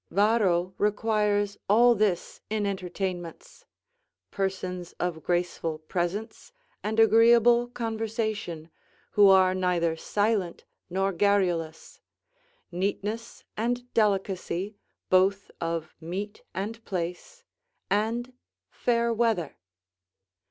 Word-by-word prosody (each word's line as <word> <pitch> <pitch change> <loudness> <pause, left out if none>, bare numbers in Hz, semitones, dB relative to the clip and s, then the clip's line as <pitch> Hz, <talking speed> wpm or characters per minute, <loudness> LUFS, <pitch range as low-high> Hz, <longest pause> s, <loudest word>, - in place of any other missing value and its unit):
Varro 195 -3 +2
requires 210 -1 +1
all 240 +4 +6
this 205 -5 -1
in 215 -1 -1
entertainments: 185 -3 -5 0.7
"Persons 185 -2 -3
of 175 -2 -3
graceful 175 -2 -1
presence 185 - -4 0.3
and 220 +2 -1
agreeable 235 +2 +6
conversation, 220 -8 -3 0.4
who 205 -1 +6
are 190 -1 +6
neither 180 -3 +1
silent 205 +1 -1 0.2
nor 195 +2 0
garrulous; 175 -4 0 0.7
neatness 205 +5 -3
and 245 +2 -2
delicacy, 195 -2 0 0.4
both 190 +2 +3
of 165 -1 -3
meat 195 +6 -5
and 220 +5 -5
place; 180 - -5 0.4
and 225 +5 -1 0.4
fair 235 -1 +1
weather." 220 -9 0
200 Hz, 90 wpm, -27 LUFS, 180-220 Hz, 0.7 s, all